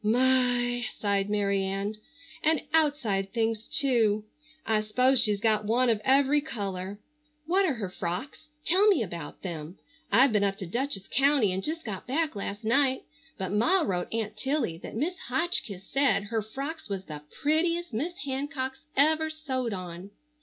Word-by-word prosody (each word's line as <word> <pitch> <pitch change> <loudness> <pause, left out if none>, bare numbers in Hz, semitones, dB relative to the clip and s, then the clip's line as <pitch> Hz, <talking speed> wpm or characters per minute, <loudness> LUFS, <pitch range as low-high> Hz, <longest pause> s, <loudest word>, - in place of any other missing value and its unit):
"My!" 245 +1 +3 0.2
sighed 200 -1 0
Mary 200 -1 +1
Ann. 195 +2 -2 0.5
"And 315 -1 +3
outside 245 -12 +1
things, 225 -1 -1
too. 225 -7 +2 0.4
I 220 -1 +2
'spose 250 +5 +3
she's 210 -4 +3
got 215 -1 +2
one 240 +3 +3
of 215 -2 0
every 275 +2 +4
color. 200 -8 -4 0.5
What 380 +4 +3
are 280 - 0
her 205 -5 -4
frocks? 195 - -5 0.2
Tell 380 +5 +5
me 380 - +4
about 170 -6 -7
them. 170 -1 -6 0.3
I've 255 +6 +6
been 210 -2 +2
up 195 -1 0
to 190 - -5
Dutchess 235 +1 -2
county 270 -5 +3
and 185 +1 -2
just 320 0 -3
got 205 -1 -6
back 305 +1 0
last 200 +2 -5
night, 260 +3 +2 0.3
but 190 -1 -3
Ma 325 - +3
wrote 180 - -1
Aunt 220 -2 -2
Tilly 260 - -1
that - - -8
Mis' 325 +10 -2
Hotchkiss 250 - -1
said 275 -6 +3
her 225 -1 +1
frocks 275 +7 -6
was 195 -1 -4
the 150 -2 -7 0.2
prettiest 335 +1 +1
Miss 300 +11 -2
Hancock's 265 0 -3 0.2
ever 315 +2 +3
sewed 265 -6 -3
on." 180 -1 -6
235 Hz, 160 wpm, -28 LUFS, 200-285 Hz, 0.5 s, I've